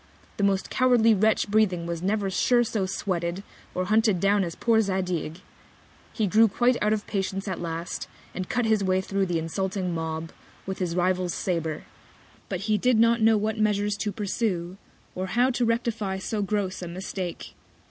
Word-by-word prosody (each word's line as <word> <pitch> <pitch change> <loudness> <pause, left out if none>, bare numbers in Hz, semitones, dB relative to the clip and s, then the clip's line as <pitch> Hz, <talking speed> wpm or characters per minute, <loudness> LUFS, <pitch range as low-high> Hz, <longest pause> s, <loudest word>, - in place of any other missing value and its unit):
The 205 - -1
most 195 -1 +1
cowardly 245 -3 +4
Wretch 215 +2 +2
breathing 200 -5 +2
was 170 -1 -4
never 200 +1 0
sure 240 +5 +3
so 215 -4 -1
sweated, 180 -1 -2 0.3
or 185 - 0
hunted 215 -2 +3
down 200 +2 +3
as 170 -2 -4
poor 225 -2 +3
Zadig! 185 -4 -2 0.7
He 220 - 0
grew 220 +4 +5
quite 245 +4 +2
out 210 - +2
of 215 -1 0
Patience 195 -1 -3
at 185 -3 -3
last, 170 0 -4 0.3
and 185 -1 -5
cut 245 -1 0
his 220 -2 +2
Way 185 0 +2
thro' 195 +1 -1
the 175 -2 -1
insulting 185 +2 -2
Mob, 160 0 -4 0.3
with 190 0 -4
his 175 -3 -1
Rival's 180 0 +1
Sabre; 165 -4 -2 0.7
but 185 -2 -3
he 210 0 +1
did 250 +2 +3
not 230 +1 +4
know 220 0 +5
what 215 +1 -1
Measures 210 -1 +1
to 210 - -2
pursue, 190 -3 -2 0.4
or 185 +1 -3
how 245 +7 +2
to 245 -1 0
rectify 230 -4 -1
so 205 +3 -3
gross 200 -2 -2
a 175 - -5
Mistake. 180 0 -5
195 Hz, 180 wpm, -26 LUFS, 180-215 Hz, 0.7 s, grew